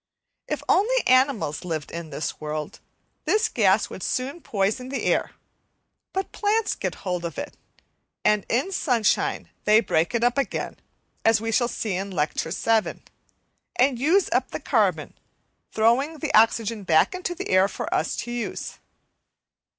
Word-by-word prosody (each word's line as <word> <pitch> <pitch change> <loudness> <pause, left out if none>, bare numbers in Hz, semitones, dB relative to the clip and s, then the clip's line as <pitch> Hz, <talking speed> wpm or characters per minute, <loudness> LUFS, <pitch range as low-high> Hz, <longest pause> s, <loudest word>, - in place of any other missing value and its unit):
If - - -3
only - - +3
animals 255 - +2
lived 160 -4 -4
in 170 -1 -6
the 150 +1 -3
world, 150 0 -5 0.5
this 435 +1 +3
gas 205 - +2
would - - -8
soon 270 - -2
poison 215 +5 -1
the 275 - -3
air; - - +1 0.8
but 385 0 -3
plants 430 +1 +1
get - - -4
hold 180 -2 -2
of 170 - -5
it, 290 +1 -6 0.7
and 210 -2 +3
in 245 +6 +2
the 385 - -8
sunshine 245 - +1
they 215 +1 +6
break 170 -1 0
it 235 - +1
up 245 +3 +2
again, 275 - -3 0.5
as 225 -1 +4
we 225 +1 -3
shall 240 +2 +2
see 220 -3 -3
in 195 +2 -3
Lecture 160 -3 -1
VII, 220 +5 0 0.7
and 255 -1 +2
use 340 +9 +3
up - - +1
the - - -5
carbon, - - +1 0.6
throwing 250 +8 +2
the 310 0 -3
oxygen 225 0 +3
back 160 - +3
into 365 -1 -3
the 385 - -6
air 185 +1 +5
for - - -5
us - - 0
to 240 - -5
use. 240 -1 -5
230 Hz, 160 wpm, -24 LUFS, 190-280 Hz, 0.8 s, they